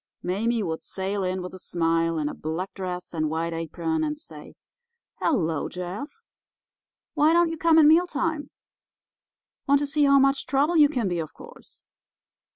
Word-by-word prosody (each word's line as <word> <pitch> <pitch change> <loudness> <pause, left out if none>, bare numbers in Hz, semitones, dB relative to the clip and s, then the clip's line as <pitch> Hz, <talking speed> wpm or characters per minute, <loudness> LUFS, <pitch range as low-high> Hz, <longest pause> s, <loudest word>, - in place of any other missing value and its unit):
Mame 220 +4 0
would 160 -1 -3
sail 195 +1 -3
in 185 0 -2
with 180 - -7
a 185 - -9
smile, 165 -1 0
in 150 -1 -1
a - - -4
black 165 +5 -5
dress 180 -2 -6
and 155 -2 -1
white 165 +1 -2
apron, 240 - -2
and 300 -1 -2
say: 315 - -12 0.6
'Hello, 165 - 0
Jeff 205 - -7 0.9
—why 310 +1 +4
don't 340 0 +4
you 325 - -5
come 330 -1 +4
at 315 - +7
mealtime? 315 -2 +2 1.2
Want 280 0 +5
to 290 - -1
see 295 0 +2
how 280 0 +6
much 275 0 +2
trouble 285 +6 +2
you 300 -3 +6
can 245 -8 -1
be, 175 -2 -1
of 155 -2 -6
course. - - -13
220 Hz, 165 wpm, -25 LUFS, -, 1.2 s, at